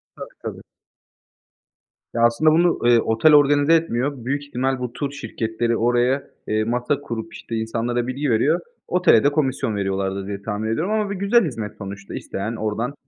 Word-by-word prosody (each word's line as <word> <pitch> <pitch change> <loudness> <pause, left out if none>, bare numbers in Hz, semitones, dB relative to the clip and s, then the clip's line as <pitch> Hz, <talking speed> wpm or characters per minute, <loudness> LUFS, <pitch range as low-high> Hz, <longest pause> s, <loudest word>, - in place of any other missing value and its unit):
Tabii, - - -8 0.2
tabii. - - -6 1.5
Ya, 115 - -1
aslında 120 +7 +4
bunu, 170 +2 +3
eee, 120 -1 +6
otel 115 +8 +3
organize 145 +2 +5
etmiyor, 140 -5 0
büyük 140 +3 -1
ihtimal 130 -1 -1
bu 125 -1 -4
tur 140 -2 -3
şirketleri 115 -2 -2
oraya, 120 +3 +2 0.2
eee, 110 0 +1
masa 125 +5 -1
kurup, 115 -4 -6
işte, 115 - -7
insanlara 120 +2 -1
bilgi 135 +2 -2
veriyor, 140 +9 +2 0.3
otele 180 -10 +4
de 145 - +4
komisyon 135 -7 0
veriyorlardır 95 -1 -2
diye 100 -1 -5
tahmin 105 +1 -3
ediyorum 160 - -1
ama 215 -2 0
bir 200 - -3
güzel 200 +4 +3
hizmet 110 -8 -5
sonuçta. 100 -1 -8
İsteyen 110 +4 -4
oradan, 110 +5 -2
120 Hz, 165 wpm, -22 LUFS, 110-145 Hz, 1.5 s, eee